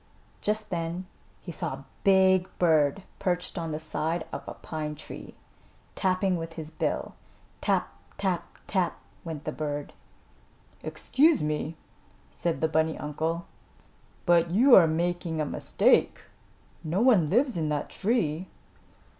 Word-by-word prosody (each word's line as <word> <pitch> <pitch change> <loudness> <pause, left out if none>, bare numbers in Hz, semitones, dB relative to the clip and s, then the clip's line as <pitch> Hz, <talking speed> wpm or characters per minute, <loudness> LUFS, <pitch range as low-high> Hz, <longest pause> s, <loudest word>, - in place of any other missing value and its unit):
Just 215 +1 -1
then 170 +1 -2 0.4
he 175 - -7
saw 150 - -3
a 135 0 -9 0.2
big 190 -1 +5
bird 160 0 +3 0.2
perched 180 -1 -1
on 165 -1 -3
the 150 - -2
side 160 +1 -2
of - - -4
a - - -6
pine 155 -1 -5
tree, 155 - -10 0.6
tapping 185 -1 +1
with 165 0 -6
his 160 -1 -7
bill. - - -2 0.5
"Tap! - - +2 0.3
Tap! 190 -3 -2
Tap!" 185 -3 0 0.3
went 160 -3 -6
the 155 - -3
bird. 145 -2 -4 0.9
"Excuse 300 - +2
me," 150 +1 -2 0.5
said 170 -2 -2
the 160 - +3
bunny 160 0 +1
uncle, 160 +3 -2 0.8
"but 170 -1 +4
you 240 +9 +5
are 175 -7 +9
making 170 0 -1
a 155 - +1
mistake. - - +2 0.6
No 165 +4 -1
one 215 - +5
lives 250 - +2
in 160 -3 -1
that 150 -1 -2
tree." 190 -6 0
170 Hz, 135 wpm, -28 LUFS, 155-185 Hz, 0.9 s, are